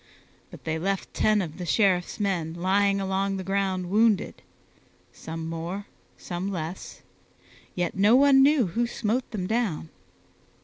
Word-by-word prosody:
But - - -13
they 160 0 -2
left 195 +2 -2
ten 215 -2 +2
of 160 0 -8
the 180 - -4
Sheriff's 185 +1 +1
men 175 -6 -1
lying 195 +3 +2
along 195 0 -1
the 190 - -5
ground 190 -1 -1
wounded 215 -1 +2 0.7
some 160 0 -7
more, 170 +5 -5 0.3
some 180 +3 -4
less 170 -1 -6 0.7
yet 175 -2 -1
no 205 +4 +5
one 275 0 +6
knew 280 -3 +5
who 230 +7 -1
smote 235 +2 -2
them 200 -5 -4
down. 205 -7 -1
195 Hz, 140 wpm, -26 LUFS, 175-215 Hz, 0.7 s, one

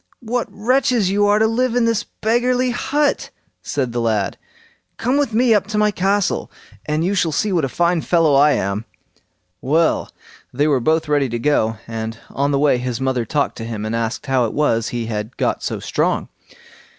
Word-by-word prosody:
"What 235 +1 -1
wretches 230 -1 +1
you 205 +1 +2
are 205 0 +4
to 220 - +3
live 240 +2 0
in 245 -1 +3
this 230 -2 +1
beggarly 245 +3 0
hut", 290 +4 0 0.3
said 130 -4 -2
the 120 0 -2
lad. 110 -4 0 0.6
"Come 250 +3 0
with 285 -3 +1
me 235 +1 +3
up 205 -2 +1
to 215 0 -3
my 210 0 +3
castle, 195 +1 0 0.4
and 155 +2 0
you 195 - 0
shall 180 -5 +1
see 195 +7 0
what 165 -5 +2
a - - -4
fine 170 +3 +1
fellow 165 -4 +2
I 145 +2 +5
am." 100 +3 -2 0.8
Well! 160 +5 +1 0.4
they 145 +4 +1
were 140 -4 +2
both 160 +5 +1
ready 145 -3 +1
to 120 - -2
go, 115 -4 +1
and 115 0 -5
on 140 +1 0
the 140 - +1
way 140 -3 +3
his 125 -1 -3
mother 130 -3 -1
talked 150 0 -1
to 115 - -6
him, 110 -2 -5
and 110 +1 -2
asked, 115 0 -3
"How 130 -3 +2
it 110 - -4
was 115 -7 +1
he 120 -1 -3
had 110 +1 -5
got - - 0
so - - -3
strong?" - - -1
155 Hz, 200 wpm, -19 LUFS, -, 0.8 s, I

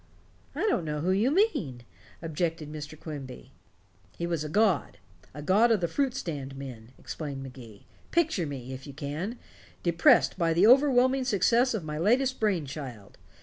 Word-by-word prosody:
"I - - -3
don't 405 - +1
know 150 -1 -3
who 180 +4 +1
you 205 +7 +2
mean," 275 - 0 0.4
objected 165 -1 -2
Mr. 155 0 -8
Quimby. 135 -4 -8 0.7
"He 170 - -2
was 170 -3 -2
a 155 - -5
god 205 +1 +1 0.4
the 150 - -7
god 205 +9 +4
of 220 - +3
the 170 - 0
fruit 265 - -1
stand 145 - -5
men," 130 -3 -9
explained 140 -4 -6
Magee. 125 -6 -12 0.2
"Picture 315 - +1
me, 130 -2 -6
if 130 +3 -9
you 140 - -8
can, 155 - -4 0.5
depressed 170 +2 +4
by 165 -1 +2
the 175 +5 +4
overwhelming 260 +1 +5
success 235 +2 +3
of 200 - -3
my 150 -1 -5
latest 255 +8 +2
brain 195 -8 +1
child. 130 -8 -9
165 Hz, 165 wpm, -28 LUFS, 140-225 Hz, 0.7 s, overwhelming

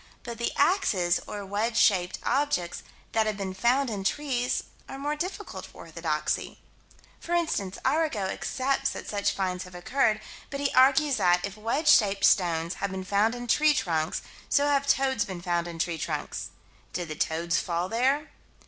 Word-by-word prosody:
But 235 -2 -7
the 235 - 0
axes, 200 - +2
or 205 -1 -6
wedge 215 +4 -1
shaped 185 -5 +3
objects 275 -12 0 0.3
that 220 -1 +2
have 215 -2 -1
been 195 -2 -4
found 245 +6 +2
in 200 -2 -3
trees, 250 +2 0 0.3
are 270 - -6
more 290 +2 -2
difficult 370 +6 -5
for - - -14
orthodoxy. - - -2 0.6
For 345 - -2
instance, 205 - -1
Arago 295 -5 +1
accepts 270 +7 -1
that - - -7
such 205 -1 0
finds 185 -2 -2
have 180 -1 -12
occurred, 215 +4 +1 0.3
but 280 - -5
he 285 -1 0
argues 270 +2 +5
that, 175 0 +3
if 200 0 -6
wedge 230 +9 -2
shaped 200 -9 +5
stones 170 -2 +3
have 200 - 0
been 190 0 -5
found 205 +4 +2
in 245 0 -6
tree 300 +5 +4
trunks, 160 - -1 0.3
so 285 0 +3
have 280 -1 +2
toads 265 -3 +2
been 190 -5 -6
found 175 -1 -1
in 170 -1 -7
tree 165 0 -1
trunks - - -4 0.4
did 175 -1 -3
the 155 - -5
toads 165 +2 0
fall 170 +1 -1
there? 265 +8 +1
215 Hz, 175 wpm, -27 LUFS, 180-275 Hz, 0.6 s, argues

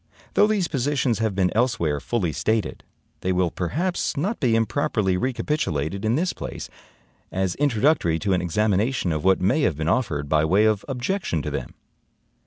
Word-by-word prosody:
Though 210 - +5
these 205 -5 +1
positions 135 -4 0
have 110 -3 0
been 95 -2 +2
elsewhere 110 - +1
fully 90 - -1
stated, 110 +2 -1 0.4
they 95 - -1
will 90 -2 +1
perhaps 170 - -2
not 200 +11 -1
be 120 -3 +2
improperly 110 -4 +1
recapitulated 100 - -1
in 110 +2 +2
this 180 +5 0
place, - - -7 0.6
as 95 -1 -1
introductory 135 - +2
to 95 +4 0
an 90 - +1
examination 105 +3 +1
of 75 -1 -2
what 95 0 +3
may 125 +12 +2
have 90 - +1
been 80 0 -2
offered 85 - 0
by 75 +1 +2
way 95 +7 +3
of 110 -2 +2
objection 130 - -2
to - - -3
them. - - -5
110 Hz, 170 wpm, -24 LUFS, 90-135 Hz, 0.6 s, Though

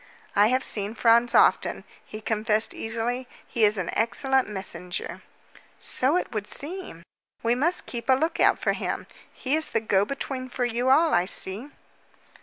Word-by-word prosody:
"I 205 +1 +6
have 255 +3 +1
seen 205 +1 -2
Franz 235 +1 +4
often," - - +3 0.2
he 215 - -9
confessed 215 0 0
easily. 235 +3 -3 0.2
"He 230 - -1
is 210 0 +4
an 180 -3 -2
excellent 265 +3 +1
messenger." 190 -3 -4 0.6
"So 275 +7 +1
it - - -3
would 210 -2 -4
seem. 300 - -4 0.4
We 230 +1 +3
must 315 +9 +1
keep 235 +1 -6
a - - +8
lookout 320 +5 +3
for - - 0
him. - - -3 0.3
He 270 +3 -1
is 315 0 0
the 225 - +1
go 200 -3 +2
between 260 +1 -4
for 245 0 -1
you 240 +2 0
all, 320 +5 +5
I 175 - +3
see." 200 +7 -4
235 Hz, 165 wpm, -26 LUFS, 215-265 Hz, 0.6 s, a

